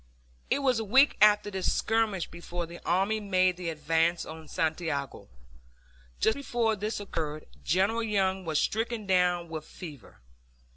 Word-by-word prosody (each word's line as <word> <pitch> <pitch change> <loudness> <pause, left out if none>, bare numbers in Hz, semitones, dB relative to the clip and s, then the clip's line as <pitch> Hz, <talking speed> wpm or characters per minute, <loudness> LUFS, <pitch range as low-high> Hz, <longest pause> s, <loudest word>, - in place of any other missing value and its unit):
It 280 - +1
was 255 -4 +3
a - - -2
week 265 +7 +5
after 210 0 +5
this 190 -1 0
skirmish 220 -5 +1
before 170 0 -5
the 170 +1 -11
army 195 +5 +2
made 185 -3 +2
the 175 -1 -4
advance 165 +2 +1
on 160 0 -9
Santiago. 160 -5 -2 0.9
Just 220 - +3
before 240 -5 0
this 210 +2 -3
occurred 155 -6 -4 0.2
General 200 +6 +2
Young 195 -4 0
was 160 -3 -1
stricken 225 +4 -1
down 180 -2 +2
with 160 -2 -6
fever. 150 - -11
185 Hz, 145 wpm, -29 LUFS, 165-215 Hz, 0.9 s, week